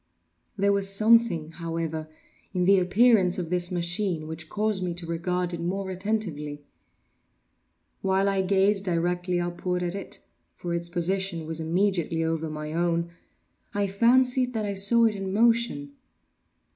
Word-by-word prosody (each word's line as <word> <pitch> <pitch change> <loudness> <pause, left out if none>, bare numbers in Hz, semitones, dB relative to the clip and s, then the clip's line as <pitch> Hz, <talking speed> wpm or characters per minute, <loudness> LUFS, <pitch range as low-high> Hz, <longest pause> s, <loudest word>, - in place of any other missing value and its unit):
There 200 0 +3
was 200 -1 +1
something, 215 -5 +3
however, 165 -1 -4 0.5
in 180 -1 +1
the 195 +1 +5
appearance 190 0 +3
of 175 -2 -4
this 180 -1 +1
machine 175 -1 -1
which 160 0 -7
caused 210 -2 -1
me 180 -2 -2
to 175 -1 -6
regard 175 +2 -2
it 170 - -4
more 190 +2 -3
attentively. 180 -7 -3 1.4
While 190 +1 +1
I 195 -1 +1
gazed 195 +1 +2
directly 175 0 0
upward 175 +1 -2
at 175 0 -2
it 195 0 -2 0.4
(for 175 -1 -5
its 170 0 -2
position 175 -1 0
was 160 0 -2
immediately 170 0 0
over 160 0 -2
my 150 0 -6
own) 170 0 0 0.6
I 205 0 +1
fancied 250 +5 +2
that 215 -1 -1
I 200 - -2
saw 200 +4 +4
it 220 - +2
in 195 -1 -4
motion. 230 -9 +2
180 Hz, 145 wpm, -26 LUFS, 170-200 Hz, 1.4 s, the